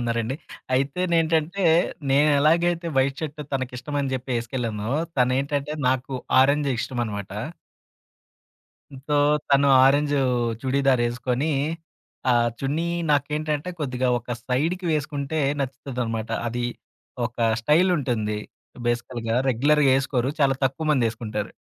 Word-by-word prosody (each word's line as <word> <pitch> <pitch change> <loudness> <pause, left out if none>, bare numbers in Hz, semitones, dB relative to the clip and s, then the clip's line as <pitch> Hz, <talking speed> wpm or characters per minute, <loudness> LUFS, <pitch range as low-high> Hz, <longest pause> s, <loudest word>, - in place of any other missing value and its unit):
ఉన్నారండి. 115 +1 -1 0.4
అయితేనేంటంటే 165 +4 +1 0.5
నేనెలాగైతే 155 +5 +3
white 135 +1 +1
shirt 155 -1 -5
తనకిష్టం 130 +1 -4
అని 135 -1 -2
చెప్పి 130 +1 -5
ఏసుకెళ్ళానో. 115 -2 -3 0.3
తనేంటంటే 140 +3 +1 0.2
నాకు 130 +1 -1 0.3
ఆరంజు 140 +1 +3
ఇష్టమనమాట 110 -5 -3 1.8
సో - - -1 0.4
తను 140 0 +5 0.2
ఆరెంజు 145 +1 +3 0.4
చుడిదారేసుకొని, 130 0 +1 0.8
ఆ - - +5 0.3
చున్నీ 150 +5 -1 0.2
నాకేంటంటే 150 +3 0
కొద్దిగా 130 -3 -1
ఒక 120 0 -5
సైడికి 165 +8 0
వేసుకుంటే 145 0 -2 0.2
నచ్చుతదన్నమాట. 125 -4 -3 0.2
అది 120 +1 -3 0.6
ఒక 120 - -13 0.2
స్టైలుంటుంది. 130 - +1 0.5
బేసికల్‌గా, 120 -1 -2
రెగ్యులర్‌గా 140 +3 +3
ఏసుకోరు. 130 -2 -1
చాలా 135 -1 +4
తక్కువ 135 +4 -1
మందేసుకుంటారు. 115 -5 -1
135 Hz, 95 wpm, -24 LUFS, 120-150 Hz, 1.8 s, తను